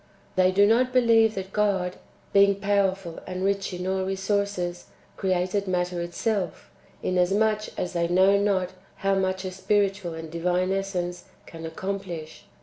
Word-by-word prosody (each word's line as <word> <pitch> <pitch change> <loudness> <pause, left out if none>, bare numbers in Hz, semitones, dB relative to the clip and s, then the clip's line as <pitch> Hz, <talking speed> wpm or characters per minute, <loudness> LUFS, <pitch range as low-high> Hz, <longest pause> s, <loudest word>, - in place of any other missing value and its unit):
They 185 0 +4
do 200 +2 +5
not 250 +4 +3
believe 230 -3 +4
that 190 0 -6
God 190 -4 +1 0.4
(being 200 0 +6
powerful, 195 -3 0
and 185 0 -4
rich 200 0 0
in 180 0 -5
all 190 0 0
resources) 195 -2 -1 0.3
created 185 +1 0
matter 180 -1 -1
itself, 180 +1 -2 0.3
inasmuch 205 +4 +2
as 180 - -3
they 170 -1 +1
know 190 +3 +5
not 200 -3 +1 0.3
how 195 - +4
much 190 0 0
a 185 - -3
spiritual 195 -2 0
and 160 -1 -8
divine 180 +2 0
essence 185 -2 -2 0.2
can 165 -1 -8
accomplish. 175 -2 -6
190 Hz, 145 wpm, -26 LUFS, 180-200 Hz, 0.4 s, being